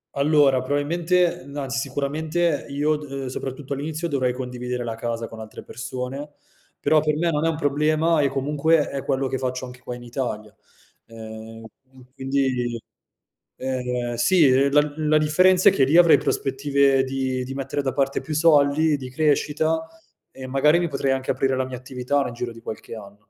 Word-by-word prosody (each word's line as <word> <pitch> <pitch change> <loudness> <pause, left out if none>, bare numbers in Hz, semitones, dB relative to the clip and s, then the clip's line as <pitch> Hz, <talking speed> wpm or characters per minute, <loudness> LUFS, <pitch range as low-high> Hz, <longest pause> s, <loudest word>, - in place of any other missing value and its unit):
Allora, 140 -2 +4
probabilmente, 170 +6 0
no 145 0 -5
anzi 125 -4 -2
sicuramente 150 +4 -1
io 150 +2 0
d 145 -2 -10
ehm, 135 -1 -4
soprattutto 135 +2 -5
all'inizio 155 +4 -3
dovrei 130 -4 0
condividere 125 -1 -4
la 115 -1 -3
casa 115 0 -4
con 115 - -11
altre 110 0 -9
persone, 130 +5 -6 0.5
però 155 - +3
per 150 -1 0
me 170 +1 +1
non 150 +1 0
è - - +3
un 160 - -1
problema 155 +2 +2
e 140 - +2
comunque 150 +3 +1
è 135 -1 -4
quello 135 0 0
che 130 - -3
faccio 130 0 -3
anche 125 0 -11
qua 125 - -6
in 120 - -11
Italia. 115 -4 -5 0.5
Ehm, 110 0 -10 0.2
qu 130 -1 -19
quindi 130 -3 -1 0.8
ehm, 125 -2 -3
sì 160 +6 +4
eh, 135 +2 +3
la 145 0 +3
la 155 0 +2
differenza 180 +5 +5
è - - +1
che 135 - +2
lì 145 +6 +4
avrei 170 -2 +7
prospettive 140 0 +1
di 130 -1 -2
di 130 - -6
mettere 135 +1 -3
da 135 - -1
parte 135 -1 0
più 155 - -5
soldi, 150 -1 +4
di 130 -2 -8
crescita, 155 +3 0 0.4
e 130 -1 -9
magari 145 +5 +3
mi 170 -2 -1
potrei 135 -1 -1
anche 130 0 -1
aprire 135 0 0
la 130 0 -1
mia 130 -1 -6
attività 130 +2 -2
nel 125 -3 -3
giro 120 0 -4
di 115 0 -13
qualche 115 +1 -8
anno. 105 -1 -13
135 Hz, 185 wpm, -23 LUFS, 125-150 Hz, 0.8 s, avrei